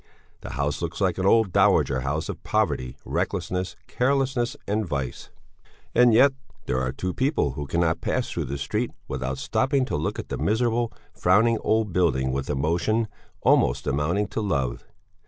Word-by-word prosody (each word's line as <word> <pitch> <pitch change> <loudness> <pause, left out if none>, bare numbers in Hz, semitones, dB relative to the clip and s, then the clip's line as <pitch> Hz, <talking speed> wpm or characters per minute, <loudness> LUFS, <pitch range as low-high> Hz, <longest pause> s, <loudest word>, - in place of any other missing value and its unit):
The - - -8
house 70 +2 -1
looks 85 -1 -4
like 95 -3 +1
an 95 - +1
old 110 -2 +4
dowager 65 -1 +4
house 70 +5 -2
of - - -6
poverty, 65 0 -1
recklessness, 90 -2 -2
carelessness, 130 -2 0
and 105 +2 0
vice. 70 - -4 0.6
And 125 -1 +6
yet 135 +5 +6 0.3
there 65 - 0
are 65 0 -1
two 90 +7 -3
people 130 - +1
who 70 +2 -5
cannot 85 +1 +1
pass - - -1
through - - -2
the 70 +2 -4
street 65 - -1 0.2
without 65 0 -3
stopping 135 - +1
to - - -3
look 75 +2 -2
at - - -6
the - - -3
miserable, 115 +2 +1 0.2
frowning 110 +5 +3
old 110 -4 +1
building 65 -8 +2
with 70 0 -3
emotion 85 +10 0 0.3
almost - - +3
amounting 80 +9 +1
to - - -3
love. 70 - -1
90 Hz, 165 wpm, -25 LUFS, 70-110 Hz, 0.6 s, And